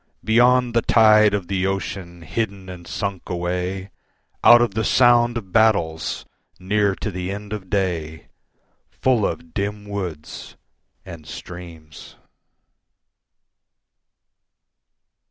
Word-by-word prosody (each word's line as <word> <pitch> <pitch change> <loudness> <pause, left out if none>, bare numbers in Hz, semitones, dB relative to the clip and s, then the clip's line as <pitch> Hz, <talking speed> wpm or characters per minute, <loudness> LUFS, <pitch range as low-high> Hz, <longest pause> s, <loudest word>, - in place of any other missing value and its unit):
Beyond 120 +2 +3
the 115 - +3
tide 110 -2 +5
of 95 -4 -4
the 95 -1 -1
ocean, 95 -3 -5
hidden 95 +1 -4
and 90 -1 -10
sunk 100 -2 -4
away, 90 +2 -3 0.5
Out 120 - +9
of 120 0 +1
the 110 - -1
sound 120 -1 +4
of 100 -5 -8
battles, 90 -8 +1 0.3
near 100 +1 +1
to 105 - -4
the 90 0 -4
end 105 +1 -6
of 95 -3 -7
day, 85 -6 -2 0.6
Full 125 -6 +1
of 80 0 -7
dim 105 +1 -3
woods 90 -7 -6 0.5
and 85 -4 -10
streams. 85 -3 -11
95 Hz, 110 wpm, -22 LUFS, 90-110 Hz, 0.6 s, Out